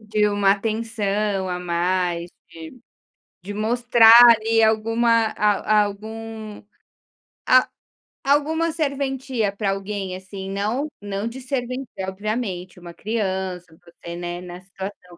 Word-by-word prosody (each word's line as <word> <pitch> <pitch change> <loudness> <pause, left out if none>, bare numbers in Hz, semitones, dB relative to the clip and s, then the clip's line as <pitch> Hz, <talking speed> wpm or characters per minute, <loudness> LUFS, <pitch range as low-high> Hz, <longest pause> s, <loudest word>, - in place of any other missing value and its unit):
De 210 -1 +1
uma 205 -1 +2
atenção 210 -2 -2
a 180 -1 -3
mais 175 0 -1 0.2
de 165 +9 -11 0.6
de 195 +4 -8
mostrar, 230 +1 +4 0.2
ali, 225 0 +3
alguma 225 +1 +2
a 210 0 +3
algum 220 +1 -7 0.9
a - - +5 0.6
alguma 315 +4 +1
serventia 270 -7 -2
pra 200 -1 -1
alguém, 195 -1 -4
assim, 190 +1 -8
não 215 +9 -1
não 205 +1 -4
de 250 +3 -7
servência 255 0 -4 0.2
obviamente, 190 -3 -4
uma 175 -1 -11
criança, 190 -4 -3 0.2
você, 170 0 -10
né, 175 0 -5
nessa 180 0 -10
situação, 190 -2 -9
210 Hz, 115 wpm, -22 LUFS, 190-230 Hz, 0.9 s, a